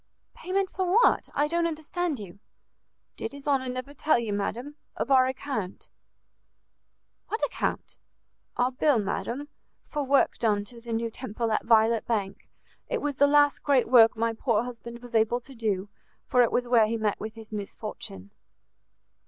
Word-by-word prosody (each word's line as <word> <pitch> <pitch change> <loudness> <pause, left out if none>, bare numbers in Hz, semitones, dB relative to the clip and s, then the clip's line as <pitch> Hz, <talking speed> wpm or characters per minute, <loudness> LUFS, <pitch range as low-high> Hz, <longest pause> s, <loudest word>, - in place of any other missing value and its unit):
"Payment 380 +1 -2
for 370 -1 -1
what? 460 +5 +4
I 290 - +2
don't 335 +2 +1
understand 320 0 -3
you." 200 -3 -10 0.8
"Did - - -5
his 280 0 -10
honour 265 -3 +1
never 255 +3 -5
tell 305 0 +2
you, 230 -3 -2
madam, 240 +8 -3 0.2
of - - -2
our 260 -1 +6
account?" 260 -7 -5 1.4
"What 440 - -1
account?" - - -3 0.6
"Our 250 +1 +2
bill, 275 +1 +2
madam, 215 +7 -3 0.4
for 295 - -3
work 275 0 +2
done 210 -3 +1
to 235 +2 -12
the 235 0 -8
new 230 0 -1
Temple 230 -1 -4
at 215 - 0
Violet 225 0 +3
Bank: 200 -4 -3 0.4
it - - -1
was 290 -2 -3
the 285 - +5
last 290 0 +4
great 275 -4 +2
work 225 -2 +6
my 230 0 0
poor 225 -1 +1
husband 235 0 -9
was 245 -1 -11
able 225 +2 +2
to 270 +3 -12
do, 210 -5 -2 0.4
for 250 - +3
it 235 - +3
was 245 - +1
there 235 -3 +4
he 230 +1 -1
met 215 -2 -1
with 220 +1 -6
his 220 -1 -11
misfortune." 200 - -7
240 Hz, 170 wpm, -27 LUFS, 220-285 Hz, 1.4 s, our